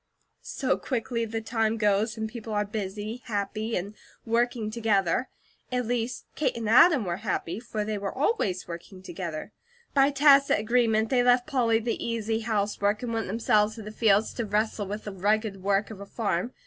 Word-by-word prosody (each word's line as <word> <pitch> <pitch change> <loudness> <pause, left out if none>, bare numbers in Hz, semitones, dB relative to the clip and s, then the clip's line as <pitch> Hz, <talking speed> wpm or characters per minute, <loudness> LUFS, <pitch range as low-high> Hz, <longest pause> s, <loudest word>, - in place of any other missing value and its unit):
So - - -1
quickly 230 -2 -2
the 225 0 -4
time 225 0 0
goes, 210 +1 +1
when 220 0 -2
people 225 -1 -7
are 210 0 +1
busy, 210 +2 -5
happy, 215 0 -2
and 195 +4 -4 0.3
working 230 -1 0
together. 215 -1 +1 0.4
At 250 -1 0
least 240 +1 -2
Kate 270 -6 -1
and 225 -2 -3
Adam 260 - +6
were 175 -1 -2
happy, 190 -2 -3
for 220 -3 -4
they 215 -1 -2
were 195 -1 -3
always 260 - 0
working 175 +2 -9
together. 170 -2 -6 0.4
By 275 0 +5
tacit 280 -1 +5
agreement, 220 0 +2
they 250 -2 +4
left 245 0 +4
Polly 240 -6 +2
the 230 +1 -3
easy 225 -1 -1
housework, 210 -1 0
and 235 -2 -3
went 225 0 -2
themselves 215 -1 +2
to 220 - -8
the 210 - -7
fields 215 -1 +2
to 235 - -3
wrestle 210 0 0
with 210 +2 -5
the 205 - -6
rugged 205 +1 0
work 200 +2 +1
of 210 - -9
a 200 - -8
farm. 200 0 -2
220 Hz, 180 wpm, -27 LUFS, 205-235 Hz, 0.4 s, Adam